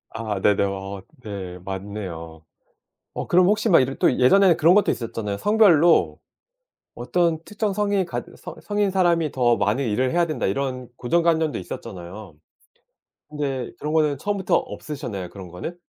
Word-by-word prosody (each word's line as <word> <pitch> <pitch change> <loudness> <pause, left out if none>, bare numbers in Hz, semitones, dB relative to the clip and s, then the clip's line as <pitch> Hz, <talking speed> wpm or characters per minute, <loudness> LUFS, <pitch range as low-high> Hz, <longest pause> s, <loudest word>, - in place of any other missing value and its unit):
아, 110 -3 -4
네네. 100 +1 +3
어 95 0 -5 0.2
네 95 -5 -7
맞네요. 95 -5 -7 0.7
어 - - -4
그럼 180 +1 +5
혹시 210 +3 +2
막 170 - +6
이렇 130 +1 0
또 - - +3
예전에는 175 +7 +5
그런 170 +4 +5
것도 205 - +3
있었잖아요. 110 -3 -3
성별로 175 - +4 0.8
어떤 170 -2 0
특정 210 -1 -3
성인이 200 -2 0
갖 170 - -5
서 - - -9
'성인 205 -1 0
사람이 170 -5 +2
더 120 -2 +2
많은 105 +7 0
일을 125 +5 0
해야 175 0 +2
된다.' 155 -2 -3
이런 125 +3 -2
고정관념도 160 +4 +1
있었잖아요. 95 -3 -9 0.9
근데 140 -4 -3
그런 150 - -4
거는 155 -3 +2
처음부터 200 0 -1
없으셨나요? 110 -11 -4
그런 95 -3 -10
거는? 90 - -7
135 Hz, 330 characters per minute, -23 LUFS, -, 0.9 s, 막